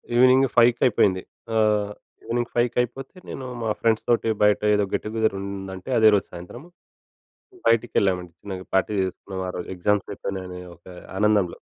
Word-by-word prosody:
Evening 130 +2 +6
ఫైవ్‌కయిపోయింది. 120 -5 +4 0.3
ఆహ్, 105 -2 +2 0.3
evening 120 0 -2
ఫైవ్‌కయిపోతే, 125 - -1
నేను 130 - -6 0.2
మా 110 - -1
ఫ్రెండ్స్‌తోటి 115 0 +1
బయటేదో 105 0 +3
గెట్ - - 0
టుగెదర్ 110 -2 0
ఉందంటే, 95 0 -7
అదే 110 - +6
రోజు 100 - 0
సాయంత్రం, 90 - -10 1.0
బయటికెళ్ళామండి, 95 -6 +1
చిన్న‌గా 95 -2 -7
పార్టీ 95 +2 +2
చేసుకున్నాం 95 +1 -5
ఆరోజు. 90 -1 -5
ఎగ్జామ్సయిపోయినయని 95 -1 -2
ఒక 85 - -26 0.3
ఆనందంలో. 105 -3 +2
105 Hz, 120 wpm, -24 LUFS, 95-115 Hz, 1.0 s, Evening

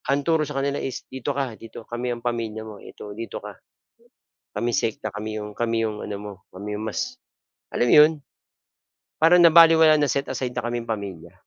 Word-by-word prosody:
Ang 140 +1 +1
turo 160 -1 +2
sa 145 -2 -3
kanila 140 +1 -1
is, 130 - -5
"Dito 130 0 -6
ka, 135 -4 -2
dito 110 0 -11
kami 120 +1 -4
ang 120 0 -5
pamilya 115 -2 -3
mo, 105 -2 -10
ito 105 - -10
dito 115 +2 -6
ka, - - -8 1.0
kami 120 - -1
sekta, 110 -2 -1
kami 110 +1 -6
'yong 105 0 -9
kami 115 -1 0
'yong 110 -2 -3
ano 100 - -5
mo, 105 -1 -7 0.2
'yong 105 +3 -5
mas" 255 - -3 0.6
Alam 120 - +2
mo - - +8
'yon? 155 +2 +7 1.0
Parang 170 +3 +5
nabalewala, 165 -2 +7
na 145 -3 +1
set 140 0 -2
aside 130 -1 -3
na 125 - -2
kaming 120 0 -3
pamilya. 100 -7 -6
120 Hz, 190 wpm, -24 LUFS, 110-140 Hz, 1.0 s, mo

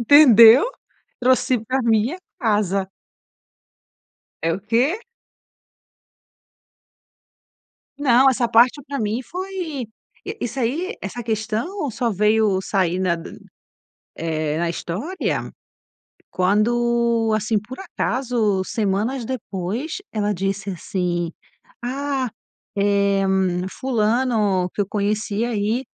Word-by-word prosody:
entendeu, 235 - +8 0.6
trouxe 255 0 +3
pra 260 +3 -1
minha 230 +7 +2 0.2
casa. 200 -4 +1 1.5
É 165 0 +1
o - - -4
quê? 240 - +1 3.0
Não, 270 -2 +5
essa 245 -2 +1
parte 240 +5 +4
pra 280 -1 -3
mim 220 +3 -1
foi 350 - -5 0.5
isso 260 +3 -4
aí, 330 - -1
essa 240 -1 -5
questão 230 - -2
só 235 0 -1
veio 210 -1 +2
sair 185 -2 0
na 180 -2 +1
d 165 - -10 0.8
eh, 155 -2 -2
na 170 0 0
história, 205 - -3 0.8
quando, 230 +3 +2
assim, 215 0 +1
por 225 +6 -10
acaso, 240 - -1
semanas 220 +5 -1
depois, 220 - -4 0.2
ela 210 -1 0
disse 195 +2 -2
assim: 175 -1 -2 0.5
"Ah, 270 0 -2 0.5
eh, 200 -1 +2 0.6
fulano 220 -6 +1
que - - -3
eu - - -5
conheci 210 +1 -1
aí 225 +2 -1
225 Hz, 95 wpm, -21 LUFS, 200-255 Hz, 3.0 s, entendeu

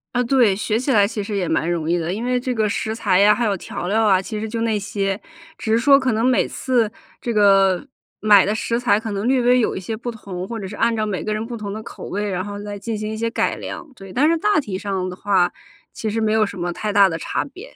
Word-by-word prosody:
啊， 245 - +2
对， 240 -5 +3
学 215 +2 -1
起 260 +3 -1
来 205 -4 +5
其 210 0 -4
实 205 0 -4
也 180 -3 -1
蛮 160 +1 0
容 165 -2 -2
易 170 - +3
的。 170 +1 -2
因 220 +5 -3
为 250 0 +1
这 255 +1 -3
个 220 -2 +1
食 220 +1 -2
材 195 -5 +2
呀， 205 +1 +6
还 235 - -1
有 205 -2 +1
调 175 - -6
料 220 +3 +2
啊， 195 -3 +5
其 210 +3 -5
实 220 0 -4
就 230 0 -3
那 225 -2 +1
些， 200 -1 -2 0.4
只 225 -3 -3
是 225 - +4
说 275 +3 +6
可 260 -3 0
能 225 +2 +1
每 255 -1 +3
次 240 -5 0 0.3
这 240 - -2
个， 195 -1 +4 0.3
买 205 -2 +6
的 210 - 0
食 230 +2 -1
材 215 -4 +3
可 220 -1 -5
能 200 +3 -2
略 260 0 +3
微 245 +1 +4
有 230 - 0
一 - - -3
些 205 +4 -4
不 235 +2 -5
同， 190 -5 -6
或 230 -1 -5
者 195 - -5
是 205 - -8
按 230 +1 +1
照 215 -1 0
每 200 -3 -3
个 215 - -3
人 215 +1 -2
不 240 +1 -6
同 210 -3 -5
的 215 +2 -5
口 - - -9
味， 205 +1 -2
然 185 -2 -2
后 205 +1 -6
再 205 0 -6
进 220 +2 -4
行 215 0 -4
一 - - -4
些 230 +1 -1
改 230 - 0
良， - - -7
对。 195 -6 -12
但 280 +8 +3
是 335 - +3
大 415 -1 +3
体 200 -10 -4
上 195 -2 -2
的 180 - -7
话， 190 -2 +2 0.4
其 220 - -3
实 220 +2 -1
没 220 -1 +1
有 220 0 +4
什 200 -1 -4
么 175 0 -2
太 210 +3 -3
大 200 -1 +6
的 165 - -3
差 - - -2
别。 370 - -12
215 Hz, 310 characters per minute, -21 LUFS, 195-235 Hz, 0.4 s, 呀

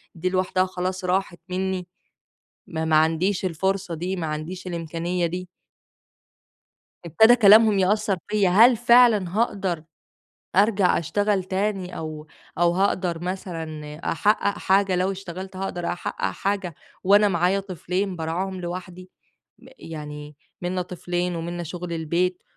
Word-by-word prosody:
دي 180 +2 -1
لوحدها 185 0 +1
خلاص، 185 0 -4
راحت 180 -1 -1
منّي، 185 -1 -2 0.8
ما 160 -1 -3
ما 160 -1 +3
عنديش 165 +5 +2
الفرصة 190 +1 -1
دي، 180 +4 -3
ما 170 -3 -3
عنديش 155 +5 -5
الإمكانيّة 170 +1 -2
دي. 180 +2 -5 1.6
ابتدى 220 +9 +6
كلامهم 215 -2 +6
يأثّر 200 0 +1
فيّا، 210 -3 +2
هل 230 +7 +7
فعلًا 235 -5 +5
هاقدر 195 -8 0 0.7
أرجع 200 -2 +4
أشتغل 195 +4 0
تاني 190 -1 -2
أو 155 -1 -6 0.3
أو 175 0 +4
هاقدر 180 -2 0
مثلًا 165 -5 -5 0.2
أحقق 205 +2 +1
حاجة 195 -1 +2
لو 185 +2 +1
اشتغلت، 190 0 -7
هاقدر 180 -2 -4
أحقق 175 - -5
حاجة 195 -4 -2 0.3
وأنا 205 +2 +5
معايا 180 +2 +1
طفلين 185 +1 -3
بارعاهم 180 +4 -3
لوحدي، 180 +1 -7 0.7
يعني 150 -2 -8 0.3
منا 180 +1 -2
طفلين 180 0 -3
ومنا 175 +1 -4
شغل 170 +1 -6
البيت، 170 +3 -1
185 Hz, 120 wpm, -24 LUFS, 170-195 Hz, 1.6 s, هل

